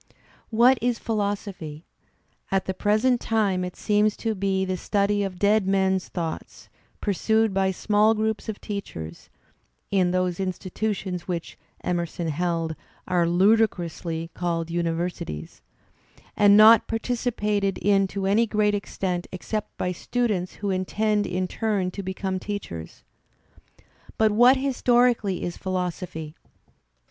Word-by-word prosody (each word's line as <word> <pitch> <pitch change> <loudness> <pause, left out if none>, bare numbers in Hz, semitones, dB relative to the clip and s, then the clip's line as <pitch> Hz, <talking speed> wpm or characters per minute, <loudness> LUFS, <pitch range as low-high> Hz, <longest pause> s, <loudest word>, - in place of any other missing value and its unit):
What 240 +3 +5
is 240 0 +1
philosophy? 200 -7 -3 0.6
At 190 -1 0
the 190 - -2
present 215 +6 +2
time 200 -5 +1
it 180 0 -5
seems 210 0 +1
to 225 -1 -1
be 190 -1 0
the 185 0 -1
study 205 +2 0
of 195 -2 -3
dead 205 +1 +3
men's 190 -1 +1
thoughts, 165 -3 -6 0.3
pursued 220 +1 +1
by 190 0 +2
smaU 210 +3 +3
groups 220 0 -2
of 215 - -4
teachers 85 - -7 0.6
(in 185 -3 +3
those 180 -1 0
institutions 185 0 -3
which, 170 -2 -4 0.3
Emerson 170 -1 -2
held, 165 0 -1 0.3
are 175 -2 +2
"ludicrously" 175 -4 +1
called 170 -2 -2
universities), 165 - -3 0.7
and 205 -1 +6
not 220 +1 +8
participated 215 -4 -1
in 195 -1 +3
to 195 0 -4
any 215 +4 +3
great 210 -1 +2
extent 185 -3 -3
except 210 +3 -5
by 180 - -1
students 200 -1 -1
who 200 -1 -2
intend 205 +3 0
in 185 +1 -1
turn 200 -3 -1
to 200 - -5
become 190 0 -3
teachers. 85 - -6 1.1
But 220 -1 +4
what 245 +5 +6
historically 245 -6 +2
is 175 - -4
philosophy? 180 -4 -4
195 Hz, 125 wpm, -25 LUFS, 180-215 Hz, 1.1 s, not